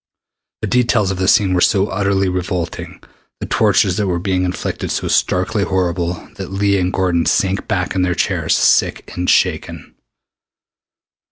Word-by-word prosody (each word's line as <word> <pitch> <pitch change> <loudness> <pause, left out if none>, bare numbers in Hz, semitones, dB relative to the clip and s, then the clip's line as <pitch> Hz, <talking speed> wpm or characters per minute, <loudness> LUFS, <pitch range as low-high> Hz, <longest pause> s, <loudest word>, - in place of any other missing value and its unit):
The - - 0
details 115 -5 +1
of 95 - -4
the 95 - 0
scene 100 -3 +3
were 90 - +1
so 100 +2 +2
utterly 95 0 0
revolting, 90 -2 -4 0.4
the - - -4
tortures 90 - +2
that 105 -2 0
were 90 -2 0
being 90 0 -1
inflicted 90 0 -4
so - - -2
starkly 95 +3 +1
horrible, 90 -2 -1 0.2
that - - -6
Leah 100 0 +1
and 90 0 0
Gordon 90 -3 0
sank 95 -3 0
back 90 -1 -1
in 95 - 0
their 90 -1 0
chairs - - 0
sick - - +1
and 90 0 -2
shaken. - - 0
95 Hz, 160 wpm, -17 LUFS, 90-100 Hz, 0.4 s, scene